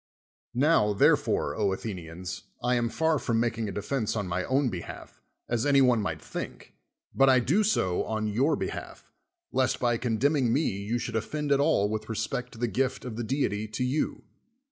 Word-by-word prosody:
Now, 130 Hz, -6 st, +4 dB
therefore, 100 Hz, -, +3 dB
Athenians, 90 Hz, -2 st, -3 dB, 0.2 s
I 125 Hz, 0 st, +2 dB
am 120 Hz, -1 st, +1 dB
far 160 Hz, +4 st, +1 dB
from 115 Hz, -2 st, 0 dB
making 115 Hz, -2 st, -1 dB
a -, -, -4 dB
defense 110 Hz, +2 st, -2 dB
on 105 Hz, -3 st, -2 dB
my 90 Hz, +1 st, -1 dB
own 135 Hz, 0 st, +2 dB
behalf, 90 Hz, -5 st, -8 dB, 0.3 s
as 120 Hz, -1 st, 0 dB
any 140 Hz, -1 st, +4 dB
one 125 Hz, -4 st, +4 dB
might 80 Hz, -5 st, -3 dB
think, -, -, -7 dB, 0.4 s
but 135 Hz, 0 st, +5 dB
I 130 Hz, -1 st, +6 dB
do 160 Hz, -, +2 dB
so 95 Hz, -, +1 dB
on 110 Hz, -1 st, -2 dB
your 125 Hz, +9 st, +2 dB
behalf, -, -, -6 dB, 0.4 s
lest 130 Hz, -1 st, +1 dB
by 120 Hz, -2 st, +2 dB
condemning 125 Hz, +2 st, +1 dB
me 145 Hz, +6 st, +2 dB
you 100 Hz, +4 st, -2 dB
should 115 Hz, -1 st, -4 dB
offend 150 Hz, +6 st, -2 dB
at 140 Hz, -, +4 dB
all 105 Hz, -7 st, +3 dB
with 110 Hz, +1 st, -4 dB
re 115 Hz, -, -2 dB
spect 125 Hz, +4 st, -3 dB
to -, -, -12 dB
the 120 Hz, +1 st, 0 dB
gift 130 Hz, +3 st, -1 dB
of 120 Hz, -3 st, -5 dB
the 120 Hz, -, -3 dB
deity 110 Hz, -4 st, -1 dB
to 110 Hz, +4 st, -3 dB
you. 130 Hz, +5 st, -1 dB
120 Hz, 190 wpm, -28 LUFS, 105-135 Hz, 0.4 s, I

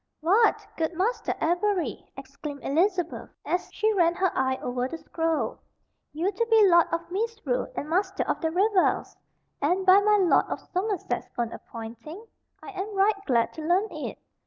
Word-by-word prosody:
"What, 395 Hz, +9 st, +3 dB
good 325 Hz, +1 st, -1 dB
Master 435 Hz, +6 st, -1 dB
Avery," 350 Hz, -, -1 dB
exclaimed 280 Hz, +1 st, -8 dB
Elizabeth, 355 Hz, +3 st, 0 dB, 0.2 s
as 360 Hz, -, -1 dB
she 435 Hz, 0 st, +1 dB
ran 345 Hz, -3 st, +3 dB
her 375 Hz, 0 st, +1 dB
eye 260 Hz, 0 st, +1 dB
over 250 Hz, 0 st, -2 dB
the 330 Hz, -, -6 dB
scroll, 325 Hz, -1 st, -2 dB, 0.5 s
"you 340 Hz, +6 st, -1 dB
to 460 Hz, +4 st, -1 dB
be 440 Hz, -3 st, +6 dB
Lord 345 Hz, -2 st, +5 dB
of 335 Hz, +1 st, -3 dB
Misrule 455 Hz, +5 st, -2 dB
and 290 Hz, -, -4 dB
Master 380 Hz, +4 st, 0 dB
of -, -, -2 dB
the 325 Hz, -, +1 dB
Revels! 385 Hz, +3 st, +1 dB, 0.5 s
And 360 Hz, +6 st, +1 dB
by 380 Hz, +1 st, +8 dB
my 420 Hz, +1 st, +4 dB
Lord 370 Hz, -4 st, +4 dB
of -, -, -3 dB
Somerset's 390 Hz, +2 st, -3 dB
own 235 Hz, -1 st, -1 dB
appointing? 235 Hz, -, -9 dB, 0.4 s
I -, -, -8 dB
am 400 Hz, +1 st, -5 dB
right 395 Hz, +2 st, +4 dB
glad 235 Hz, -4 st, +2 dB
to 320 Hz, -, -8 dB
learn 360 Hz, +7 st, +1 dB
it." -, -, -6 dB
360 Hz, 165 wpm, -26 LUFS, 315-405 Hz, 0.5 s, by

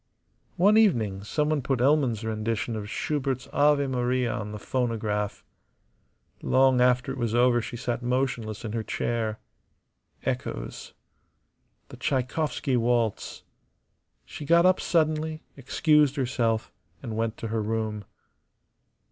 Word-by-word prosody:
One 205 Hz, +5 st, +5 dB
evening 110 Hz, -, +2 dB
someone 150 Hz, +6 st, 0 dB
put 130 Hz, 0 st, -1 dB
Elman's 130 Hz, -4 st, +2 dB
rendition 110 Hz, +1 st, -2 dB
of 105 Hz, -1 st, -5 dB
Schubert's 135 Hz, -1 st, -2 dB
"Ave 145 Hz, 0 st, +4 dB
Maria" 125 Hz, -2 st, 0 dB
on 110 Hz, -3 st, -4 dB
the 105 Hz, -, -5 dB
phonograph. 105 Hz, -3 st, -2 dB, 1.0 s
Long 130 Hz, -1 st, +4 dB
after 125 Hz, +2 st, +3 dB
it 135 Hz, -, -6 dB
was 115 Hz, -1 st, -1 dB
over 120 Hz, 0 st, +4 dB
she 120 Hz, -, -6 dB
sat 120 Hz, 0 st, -3 dB
motionless 120 Hz, -4 st, -2 dB
in 110 Hz, -, -4 dB
her 115 Hz, -, -1 dB
chair. 110 Hz, -1 st, -2 dB, 0.9 s
Echoes. -, -, -4 dB, 0.9 s
The -, -, -11 dB
Tschaikowsky 135 Hz, 0 st, -1 dB
waltz. 115 Hz, -2 st, 0 dB, 0.8 s
She 150 Hz, -, -8 dB
got 170 Hz, +4 st, +4 dB
up 185 Hz, 0 st, +4 dB
suddenly, 155 Hz, -1 st, 0 dB
excused 145 Hz, +1 st, +2 dB
herself, 120 Hz, -5 st, -1 dB, 0.3 s
and 115 Hz, -4 st, -5 dB
went 115 Hz, 0 st, -2 dB
to 115 Hz, -, -5 dB
her 110 Hz, 0 st, -1 dB
room. 110 Hz, -1 st, -2 dB
125 Hz, 120 wpm, -26 LUFS, 110-140 Hz, 1.0 s, One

